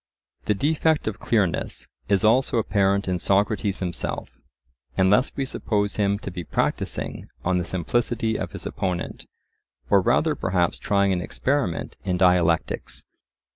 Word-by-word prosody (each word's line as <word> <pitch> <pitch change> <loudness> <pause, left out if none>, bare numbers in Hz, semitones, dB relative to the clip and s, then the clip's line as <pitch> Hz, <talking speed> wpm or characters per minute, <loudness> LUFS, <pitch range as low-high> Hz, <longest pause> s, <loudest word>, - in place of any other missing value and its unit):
The 105 - +2
defect 155 +5 +1
of 110 0 -3
clearness 100 -7 0 0.2
is 100 0 +3
also 120 +3 +4
apparent 100 -2 +2
in 90 -1 0
Socrates 100 +1 +1
himself, 90 -2 -3 0.7
unless 100 +8 +4
we 135 - -1
suppose 105 -5 -1
him 100 -1 +2
to 95 - -4
be 90 0 -5
practising - - -2 0.2
on 90 0 +2
the - - -1
simplicity 115 +5 0
of - - -4
his - - -7
opponent, 90 -2 -3 0.6
or - - +6
rather - - +2
perhaps 90 -2 0
trying 100 -1 +2
an 90 - -1
experiment 130 - -1
in 90 -2 0
dialectics. 90 -2 +2
100 Hz, 135 wpm, -24 LUFS, 90-110 Hz, 0.7 s, or